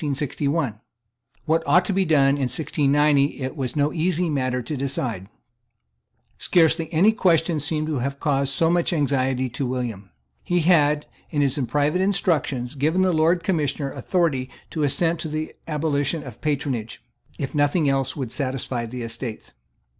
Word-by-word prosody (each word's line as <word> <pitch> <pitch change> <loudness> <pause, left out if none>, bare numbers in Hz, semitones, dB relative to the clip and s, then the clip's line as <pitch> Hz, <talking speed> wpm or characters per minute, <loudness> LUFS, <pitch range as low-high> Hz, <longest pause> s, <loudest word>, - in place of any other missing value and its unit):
What 165 +1 +2
ought 175 +6 +4
to 195 - -1
be 190 0 +2
done 145 -4 +4
in 140 -2 0
1690 145 +1 +2
it 130 +2 -4
was 130 -4 -3
no 145 +1 +1
easy 170 0 0
matter 130 -3 -1
to 150 +6 -4
decide. 125 -8 -3 1.1
Scarcely 165 -1 +2
any 180 +7 +5
question 170 -7 +2
seems 155 +1 -1
to 150 -4 -1
have 140 +3 -3
caused 140 -2 +1
so 165 +4 +3
much 175 +1 +1
anxiety 135 -4 0
to 125 +2 -3
William. 120 -6 -4 0.3
He 175 0 +1
had, 150 -3 +3 0.2
in 145 -3 +1
his 140 +1 +1
private 150 +7 +1
instructions, 165 -10 0
given 155 +6 +1
the 185 -1 +2
Lord 165 +2 +2
Commissioner 150 -6 -1
authority 150 -8 0 0.2
to 160 - -3
assent 165 +3 +1
to 165 - -3
the 155 0 -4
abolition 150 0 -1
of 125 -4 -11
patronage, 135 -7 -2 0.3
if 135 - -4
nothing 145 +2 +2
else 135 -2 0
would 130 -6 -4
satisfy 130 -3 -3
the 125 +1 -6
Estates. 115 0 -6
145 Hz, 155 wpm, -23 LUFS, 130-160 Hz, 1.1 s, any